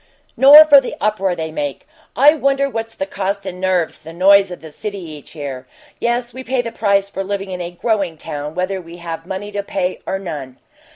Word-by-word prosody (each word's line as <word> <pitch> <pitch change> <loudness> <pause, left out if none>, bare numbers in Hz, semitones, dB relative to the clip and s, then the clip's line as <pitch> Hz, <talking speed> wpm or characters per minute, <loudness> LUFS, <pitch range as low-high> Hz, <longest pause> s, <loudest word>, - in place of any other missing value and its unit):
Nor 295 +3 +9
for 285 -3 +7
the 255 - -6
uproar 195 -3 0
they 160 -1 -4
make. 145 -3 -4 0.3
I 290 +3 +6
wonder 275 -2 +1
what's 225 -3 -5
the 190 - -3
cost 195 0 -3
in 180 -1 -6
nerves 185 -3 0
for - - -30
the 165 - -9
noise 195 +2 +5
of 180 - -8
the 160 -1 -11
city 200 +6 -6
each 155 -4 -10
year. 135 -4 -6 0.3
Yes, 240 0 -1
we 260 +1 -8
pay 255 -1 -1
the 230 - -5
price 200 -3 +1
for 195 -1 -5
living 195 0 -4
in 180 -1 -4
a 170 - -4
'growing 190 -2 -1
town,' 150 +1 -6
whether 185 +1 -2
we 170 0 -12
have 165 -1 -7
money 195 +2 -5
to 205 0 -2
pay 190 -2 -3
or 190 - -1
none." 145 -9 -7
190 Hz, 220 wpm, -18 LUFS, 170-215 Hz, 0.3 s, Nor